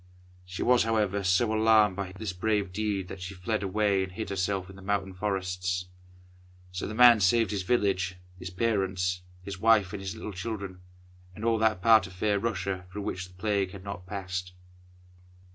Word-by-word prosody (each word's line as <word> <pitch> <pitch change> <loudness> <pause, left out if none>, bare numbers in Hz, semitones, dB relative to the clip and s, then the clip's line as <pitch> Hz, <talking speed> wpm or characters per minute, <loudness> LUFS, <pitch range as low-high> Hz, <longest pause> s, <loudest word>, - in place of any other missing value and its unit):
She 90 0 -4
was, 125 -1 +4
however, 105 -3 +1
so 95 +5 +2
alarmed 110 -3 +4
by 95 -1 -5
this 95 0 -5
brave 100 0 0
deed 100 -2 -1
that 95 - -8
she 95 +2 -6
fled 105 +4 -2
away 100 0 +1
and 95 -1 -3
hid 110 +2 -5
herself 95 -1 -1
in 95 - -12
the 95 - -12
mountain 100 -1 -1
forests. 90 -2 -2 0.8
So 90 0 -4
the 110 - -6
man 120 -1 +8
saved 110 +4 +3
his 100 -2 -1
village, 95 -3 +1 0.2
his 90 - -6
parents, 95 -3 0 0.2
his 95 0 -7
wife, 110 -3 +4
and 100 - -5
his 95 +1 -5
little 110 -1 -6
children, 95 -2 -5 0.5
and 105 - -6
all 115 -1 +2
that 110 -4 +1
part 110 -4 +6
of 90 - -13
fair 100 +2 0
Russia 95 -4 -3
through 100 +1 -5
which 90 -2 -4
the 90 - -19
Plague 100 -1 -1
had 95 -2 -9
not 100 -2 -7
passed. 90 -2 -4
95 Hz, 185 wpm, -28 LUFS, 90-110 Hz, 0.8 s, man